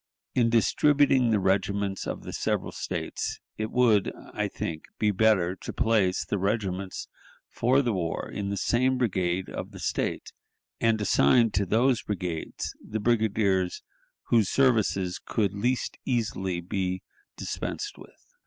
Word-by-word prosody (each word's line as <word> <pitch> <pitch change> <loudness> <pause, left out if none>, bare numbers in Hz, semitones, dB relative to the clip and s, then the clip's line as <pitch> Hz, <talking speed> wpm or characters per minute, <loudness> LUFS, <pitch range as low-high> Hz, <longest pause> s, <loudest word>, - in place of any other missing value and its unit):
In 120 -2 +3
distributing 135 +2 +4
the 110 - +3
regiments 95 +1 0
of - - -4
the - - -7
several - - -1
States - - -4 0.2
it 110 0 -1
would, 115 -6 +3 0.2
I - - 0
think, 80 -1 -5
be 105 -1 +2
better 95 -3 +3
to - - -6
place 105 -5 +2
the 100 - -2
regiments 95 -2 -2 0.4
for 130 +4 +2
the 120 -3 0
war 85 -4 -2
in 100 -1 -4
the 100 - -2
same 130 +5 +2
brigade 95 -6 0
of - - -6
the - - -11
State, - - -2 0.5
and 115 -1 +2
assign 105 - +4
to 100 0 0
those 120 +5 +3
brigades 90 -5 -4
the 110 - -4
brigadiers 105 -5 +1 0.5
whose 110 -5 +4
services 110 -8 +2
could 100 -3 0
least 120 +5 -1
easily 95 -8 -1
be 95 +1 -2 0.3
dispensed 415 -1 -4
with. - - -16
105 Hz, 140 wpm, -27 LUFS, 95-120 Hz, 0.5 s, distributing